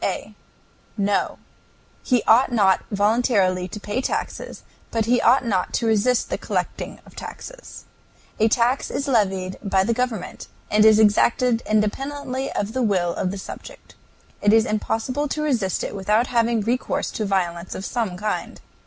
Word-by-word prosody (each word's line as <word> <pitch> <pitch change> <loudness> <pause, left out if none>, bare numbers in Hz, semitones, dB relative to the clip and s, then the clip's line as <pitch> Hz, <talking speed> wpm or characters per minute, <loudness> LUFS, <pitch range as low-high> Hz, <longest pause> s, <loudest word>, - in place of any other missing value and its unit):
A. - - -3 0.6
No; 200 0 0 0.6
he 250 -3 +1
ought 245 +4 +4
not 195 -5 +3
voluntarily 205 -3 +2
to 210 +4 -8
pay 210 +5 -3
taxes, - - -4 0.3
but 225 -1 0
he 245 +2 +2
ought 255 +2 +4
not 190 -6 0
to 235 - 0
resist 225 +3 +2
the - - -1
collecting - - -3
of - - -17
taxes. - - -9 0.5
A 220 - +4
tax 240 +3 +1
is 280 - -3
levied 190 -7 0
by 195 -2 +2
the 230 +4 +1
government, 245 -5 -3 0.2
and 210 0 +5
is 220 -1 +7
exacted 230 +3 +3
independently 265 +5 -1
of 205 +2 -2
the 260 - -1
will 185 -6 +1
of 185 - -2
the 200 - -5
subject. 190 - -10 0.5
It 205 +1 +4
is 225 0 +5
impossible 225 +6 -1
to 305 +2 -3
resist 230 -11 0
it - - -4
without 210 +4 +2
having 235 -2 +1
recourse 240 +4 -1
to 215 - -3
violence 180 -3 -2
of 190 - -5
some 220 -7 -2
kind. 210 +2 -3
220 Hz, 160 wpm, -22 LUFS, 200-245 Hz, 0.6 s, is